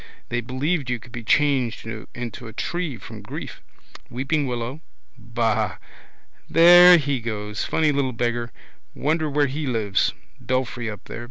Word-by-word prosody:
They 120 0 -1
believed 135 +4 -2
you 125 - 0
could 120 +1 -16
be 115 0 -7
changed 135 -2 +1
into 115 +1 -7
a 110 - -10
tree 170 +1 -3
from - - -10
grief. - - -8 0.5
Weeping 135 +4 -1
willow. 125 +4 -4 0.3
Ba. 115 -4 -1 0.7
There 175 +2 +9
he 140 -4 -1
goes. 105 -2 -4
Funny 155 -2 +2
little 140 -2 0
beggar. 120 0 -2 0.4
Wonder 155 +1 0
where 145 0 +2
he 140 +2 -3
lives. 110 -5 0 0.2
Belfry 125 -2 -2
up 105 - -8
there. - - -8
125 Hz, 145 wpm, -23 LUFS, 115-145 Hz, 0.7 s, There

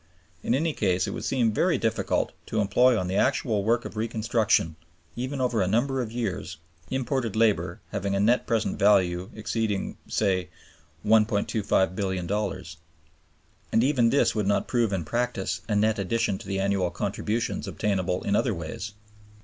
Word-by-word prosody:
In 120 - +1
any 160 +3 0
case, 90 -7 +1
it - - -4
would - - -5
seem 120 -4 +2
very - - +2
difficult - - 0 0.2
to 110 - -1
employ 115 +5 +4
on 90 - -1
the 95 +2 -1
actual 115 -6 +1
work 115 +3 +1
of - - -7
reconstruction, 110 -6 +1 0.4
even 130 +3 -3
over 125 -4 +1
a 95 - +1
number 130 +6 +1
of 115 -3 -4
years, 100 -7 -3 0.3
imported 130 -4 -1
labor 110 -2 +1
having 100 0 -1
a - - +1
net 115 +5 +2
present 115 -2 0
value 95 -3 +3
exceeding 110 -2 -2
(say) 95 -4 0 0.6
$1,250,000,000; 100 -4 0 0.9
and 115 - +3
even 130 -4 +3
this 120 -2 +3
would 105 -3 -1
not 100 - +1
prove 120 -4 +1
in 95 -5 -2
practice 115 -3 -2
a 105 - +1
net 110 +1 +2
addition 115 0 0
to - - -11
the 95 0 -2
annual 95 -2 +1
contributions 105 +4 -2
obtainable 95 -3 -1
in 100 - +1
other - - +1
ways. 85 +6 -6
105 Hz, 155 wpm, -26 LUFS, 95-115 Hz, 0.9 s, employ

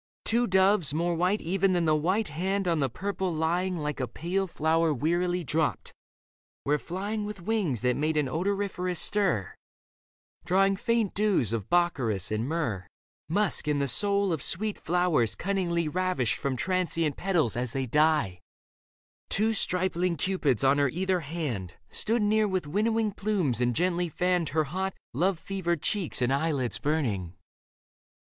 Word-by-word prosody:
Two 235 +1 +2
doves, 190 -5 +3
more 170 +2 +1
white 180 +5 +1
Even 190 +2 +1
than 175 -2 +1
the 155 - +3
white 185 +7 0
hand 190 +5 -1
on 165 -2 +1
the 135 -2 +1
purple 190 +5 -3
lying 175 +3 0
Like 150 -2 -3
a 130 - -1
pale 190 +7 -2
flower 160 0 +1
wearily 175 +5 0
dropped, 155 0 -1 0.7
were 150 +1 +2
flying 205 +6 -4
With 205 -3 -7
wings 190 - 0
that 125 0 +1
made 155 +1 0
an 150 -2 +1
odoriferous 180 +2 -1
stir. 190 - +1 0.9
Dropping 195 +3 +2
faint 230 -2 0
dews 195 - +1
of 110 -2 -3
bakkaris 125 - +1
and 110 +3 -1
myrrh, 130 - -2 0.4
Musk 200 -2 +1
and 150 -1 +1
the 140 - 0
soul 200 - +1
of 155 - -3
sweet 210 +7 -1
flowers 175 -9 +1
cunningly 175 -4 -1
Ravished 180 - 0
from 140 -2 -1
transient 165 -3 0
petals 175 - 0
as 120 0 -2
they 135 -1 -1
die. 150 - +2 0.9
Two 220 +2 +2
stripling 180 -3 +1
cupids 145 - 0
on 135 +2 +4
her 140 -2 +3
either 185 +4 0
hand 140 - -4 0.2
Stood 225 +1 0
near 215 +1 +3
with 185 -4 -1
winnowing 215 +6 0
plumes 190 - -1
and 120 -1 +1
gently 175 0 0
fanned 180 -1 0
Her 155 +1 +1
hot, 190 +6 -3 0.2
love 180 +7 +1
fevered 175 -3 -3
cheeks 180 -10 0
and 125 +2 +2
eyelids 140 -7 0
burning. 110 - -1
170 Hz, 155 wpm, -28 LUFS, 145-190 Hz, 0.9 s, on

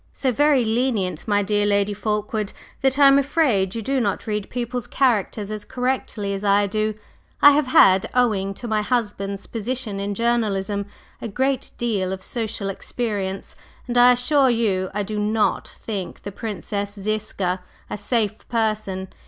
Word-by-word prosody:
"So 260 - 0
very 285 -1 +3
lenient, 220 -7 -1
my 205 -1 +2
dear 205 +1 +1
Lady 200 0 +2
Fulkeward, 210 0 -2 0.3
that 265 -1 +2
I 285 -1 +7
am 275 0 +6
afraid 260 - +1
you 225 - -3
do 270 +4 0
not 200 -4 -1
read 210 -2 -3
people's 245 -1 -3
characters 215 -5 0
as 215 -1 -5
correctly 245 -5 -2
as 195 +1 -4
I 200 0 +4
do. 215 +1 -1 0.4
I 290 - +9
have 290 -1 +2
had, 190 -6 +5
owing 200 -6 +1
to 240 - -7
my 215 -1 +1
husband's 205 -4 -2
position 230 -2 -3
in 200 0 -3
journalism, 205 -3 0 0.3
a - - -3
great 265 +5 -1
deal 205 -6 -1
of 190 0 -5
social 220 -3 -3
experience, 195 -1 -4 0.3
and 240 - -3
I 245 +1 +7
assure 265 +2 +3
you 200 -6 +1
I 205 +1 -2
do 210 +1 -4
not 210 +1 +1
think 200 -5 -6
the 200 - -5
Princess 205 -1 -4
Ziska 195 -3 -2 0.3
a - - -4
safe 215 0 -1
person. 215 -5 -1
215 Hz, 160 wpm, -22 LUFS, 200-245 Hz, 0.4 s, I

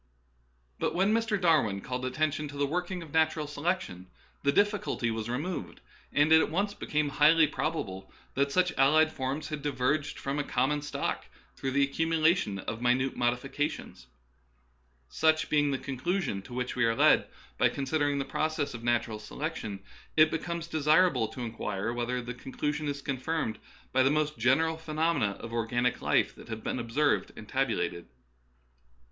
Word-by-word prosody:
But - - -1
when 195 +4 +3
Mr. 225 -2 +1
Darwin 155 - +3
called 125 +4 -4
attention 155 +3 -1
to 145 0 -9
the 140 - +2
working 180 +4 -3
of 155 - -13
natural 160 -1 +2
selection, 145 - -3 0.3
the 140 - +3
difficulty 205 - +1
was 110 0 -4
removed, 155 +9 -4 0.3
and 145 +2 +3
it 160 0 +8
at - - 0
once 200 +6 0
became 150 -6 -1
highly 155 +3 +5
probable 120 -12 -3 0.2
that 140 +1 +1
such 180 +1 +2
allied 155 +4 +5
forms 135 +3 -3
had 150 -2 -4
di 145 - -1
verged 145 +3 0
from 140 +1 -3
a - - 0
common 140 +3 0
stock 145 - -3 0.3
through 135 - -3
the 140 +1 +3
accumu 160 +3 0
lation 155 - +2
of 115 - -4
minute 125 +2 +2
modifications. 125 +5 -2 1.0
Such 155 - +2
being 145 -1 +3
the 135 - 0
conclusion 140 - -2
to 125 - -12
which 125 0 -2
we 125 - +1
are 115 0 +2
led - - +5 0.3
by - - +5
considering 145 +1 0
the 135 - -1
process 155 -2 -1
of 120 -1 -8
natural 120 -2 0
selection, 110 -5 -5 0.4
it 155 0 +6
becomes 170 +1 -3
desirable 155 -5 +3
to 125 - -8
inquire 110 -2 -3
whether 120 +1 -2
the 120 +1 -5
conclu 135 +4 -3
sion 150 0 -4
is 140 -1 -4
confirmed 140 -2 -2 0.3
by 130 - +4
the 130 - +4
most 150 +1 +1
general 155 +7 +3
phenomena 160 -8 0
of 115 +3 -9
organic 120 +2 0
life - - +2
that - - -14
have 110 -1 -5
been - - -2
observed 120 +6 +1
and 105 - -10
tab 135 +4 +1
ulated. 85 -4 -2
145 Hz, 170 wpm, -29 LUFS, 125-160 Hz, 1.0 s, it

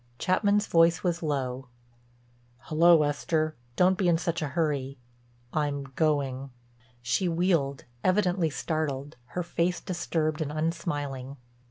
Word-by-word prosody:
Chapman's 205 - +2
voice 165 +1 +4
was 175 -2 0
low: 135 -4 -2 1.0
"Hullo, 165 0 +6
Esther. 155 +2 0 0.2
Don't 185 +1 +3
be 190 - +2
in 170 -1 +4
such 170 0 -2
a 155 - -1
hurry. 140 -3 -1 0.6
I'm 145 -2 -1
going." 140 -4 0 0.5
She 120 +10 +1
wheeled, 165 -5 +1 0.2
evidently 185 -3 +2
startled, 145 -2 -3 0.2
her 180 - +1
face 175 +1 0
disturbed 160 -3 -2
and 150 -2 -2
unsmiling. 145 -4 -3
155 Hz, 120 wpm, -28 LUFS, 140-175 Hz, 1.0 s, Hullo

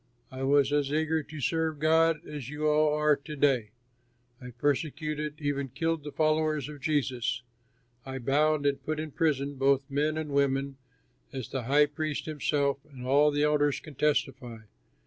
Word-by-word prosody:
I 130 0 -7
was 140 +1 +3
as 145 -1 +1
eager 160 +1 +1
to 150 +1 -10
serve 160 +2 0
God 160 +1 +3
as 145 -4 -6
you 150 +1 -2
all 150 0 +3
are 150 -1 +3
to 150 +2 -9
day. 135 -7 +2 0.7
I 125 - -8
persecuted 150 +3 -2
and 150 - -9
even 140 -1 -1
killed 165 +3 -2
the 150 - -6
followers 155 -2 +1
of 145 -2 -10
Jesus. 130 -5 -1 0.6
I 135 +1 -6
bound 145 +4 +1
and 140 -1 0
put 155 0 -2
in 155 -1 -5
prison 145 -3 0
both 135 0 +3
men 150 +2 0
and 155 -2 -4
women, 140 -1 0 0.5
as 130 -3 -6
the 130 -3 -4
high 145 +4 +5
priest 150 0 -4
himself 145 -2 0
and 125 -2 -9
all 145 +3 +4
the 145 0 0
elders 145 -1 +2
can 155 - -12
testify. 130 -5 -1
145 Hz, 170 wpm, -28 LUFS, 135-155 Hz, 0.7 s, high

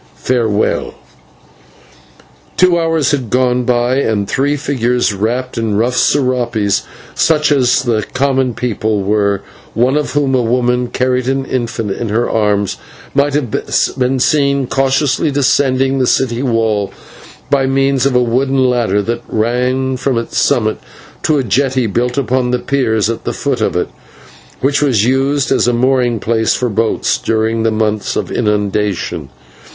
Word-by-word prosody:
Farewell." 115 -4 -1 1.6
Two 180 -2 +4
hours 165 -3 +1
had 130 -6 -2
gone 125 0 +1
by, 125 +1 +1
and 110 -7 0
three 145 +5 0
figures, 125 -5 0
wrapped 120 +5 -2
in 110 -3 -1
rough 120 +3 +1
/serapes/, 125 -7 +1 0.3
such 150 -2 +2
as 130 -4 +3
the 110 -3 0
common 130 -2 +1
people 110 -4 -1
wore, 100 -1 +1 0.3
one 125 +4 +2
of 150 -1 -1
whom, 145 -2 +1
a 130 - +3
woman, 125 +1 +1
carried 125 0 -1
an 135 0 0
infant 115 -5 -3
in 115 +3 -3
her 115 +3 0
arms, 105 -3 0 0.4
might 140 0 +1
have 135 -7 -1 0.5
been 130 +1 +1
seen 140 0 +2
cautiously 135 +3 +1
descending 135 -1 +1
the 130 - +1
city 120 -2 +1
wall 115 -5 0 0.6
by 135 -2 +2
means 135 0 +2
of 135 - -1
a 125 - +4
wooden 130 +2 +1
ladder 110 -5 +1
that 115 +3 -3
ran 125 +4 0
from 130 -1 -1
its 115 - -2
summit 110 -6 +1 0.4
to 155 - +1
a 135 - 0
jetty 130 +3 +1
built 120 +4 -1
upon 130 -2 0
piers 115 -6 +1
at 115 0 -4
the - - -3
foot - - -2
of - - 0
it, - - -1 0.7
which 140 +2 +1
was 120 -8 +2
used 135 +2 +1
as - - +2
a 120 - +2
mooring 125 -1 +1
place 110 +1 +1
for 125 - -1
boats 110 +1 0
during 110 0 0
the 115 - +2
months 110 -1 -1
of - - -3
inundation. 100 -7 -1
125 Hz, 150 wpm, -15 LUFS, 110-135 Hz, 1.6 s, Two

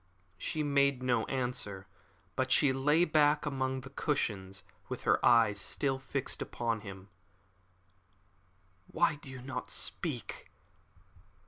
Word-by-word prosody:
She 155 - -2
made 140 -2 +2
no 120 -3 +1
answer, 125 -7 -2 0.5
but 130 -1 +4
lay 145 +5 +3
back 150 -2 +3
among 130 -2 -2
her 135 - -10
cushions 100 - -2 0.3
with - - -5
her - - +2
eyes 115 -4 +5
still 135 -2 -1
fixed 135 0 -2
upon 115 -2 -2
him. 95 -1 -10 1.8
"Why 160 -2 +1
do 145 - -10
you 130 -1 -9
not 130 -1 -5
speak?" - - -3
130 Hz, 115 wpm, -32 LUFS, 115-140 Hz, 1.8 s, eyes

